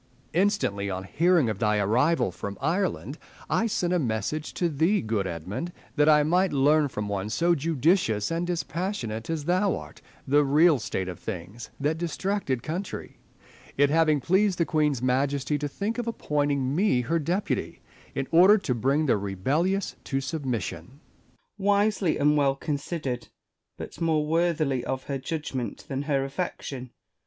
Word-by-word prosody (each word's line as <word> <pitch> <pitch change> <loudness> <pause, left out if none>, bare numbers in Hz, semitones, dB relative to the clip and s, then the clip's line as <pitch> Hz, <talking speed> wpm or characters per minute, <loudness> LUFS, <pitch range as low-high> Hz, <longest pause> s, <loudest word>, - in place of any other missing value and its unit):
] - - -37 0.3
Essex. 170 - +2
Instantly 105 - 0
on 95 0 -3
hearing 165 - +3
of 105 -3 -2
thy 105 -2 +2
arrival 120 - +2
from 100 +2 -6
Ireland, 165 -1 -1 0.3
I 230 - +2
sent 180 -5 0
a 180 - +2
message 130 +4 -2
to 175 - +1
thee, 165 +7 +2
good 110 -4 -1
Edmund, 95 - -5 0.2
that 150 0 +4
I 150 -1 +6
might 180 +5 +2
learn, 145 +2 +4
from 105 -6 -4
one 100 0 -3
so 170 +9 +2
judicious 150 - +1
and 170 +1 -1
dispassionate 165 - -3
as 160 -3 -2
thou 185 +3 +2
art, - - -11 0.3
the 145 +2 +4
real 150 +2 +4
state 100 -4 -3
of 90 -2 -6
things 105 +3 -7
iti - - -8
that 160 - -2
distracted 170 - -2
country; 180 +5 -5 0.6
it 145 +1 +4
having 155 -2 +3
pleased 190 +6 +2
the 170 - +2
Queen's 150 -6 +1
Majesty 140 +3 +1
to 145 - -2
think 205 - -3
of 240 - -3
appointing 145 - 0
me 180 -9 +3
her 165 +7 0
deputy, 175 +6 -2 0.3
in 135 -1 -2
order 185 +6 +7
to 185 -10 -1
bring 135 +6 +1
the 125 - +3
rebellious 140 - -1
to 135 - -1
submission. 125 - -4 0.4
Spenser. - - -44
Wisely 200 -3 +2
and 150 +1 +3
well 140 -2 +3
considered; 140 -3 -3 0.5
but - - -9
more 160 -2 +2
worthily 155 -5 +1
of 130 +1 -3
her 140 -1 -3
judgment 140 -4 -4
than 135 -3 -3
her 135 -2 +2
affection. 135 -3 -5
145 Hz, 165 wpm, -26 LUFS, 125-170 Hz, 0.6 s, order